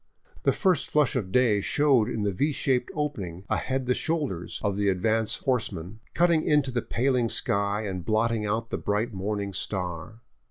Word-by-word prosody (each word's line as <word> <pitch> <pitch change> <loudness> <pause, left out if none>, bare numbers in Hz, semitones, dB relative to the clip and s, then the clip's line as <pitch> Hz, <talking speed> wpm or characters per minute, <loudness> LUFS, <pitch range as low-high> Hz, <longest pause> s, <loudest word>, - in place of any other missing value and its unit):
The - - +3
first 185 -7 +1
flush 150 -2 +2
of 100 -7 -2
day 115 -3 +3
showed 135 -3 +3
in 110 - -2
the 100 - +1
V 145 +11 0
shaped 130 -3 0
opening 100 - -3
ahead 130 0 -1
the 125 - +2
shoulders 140 - -2
of 100 -2 0
the 100 0 +1
advance 110 +4 +1
horseman, 105 -6 -2 0.2
cutting 170 -1 +3
into 145 -3 +2
the 120 -1 -1
paling 125 -1 0
sky 100 +1 0
and 95 -4 -4
blotting 110 +2 +1
out 110 +2 -2
the - - -2
iDright 105 +3 -1
morning 100 +1 -3
star. 95 +3 -4
110 Hz, 170 wpm, -26 LUFS, 100-130 Hz, 0.2 s, The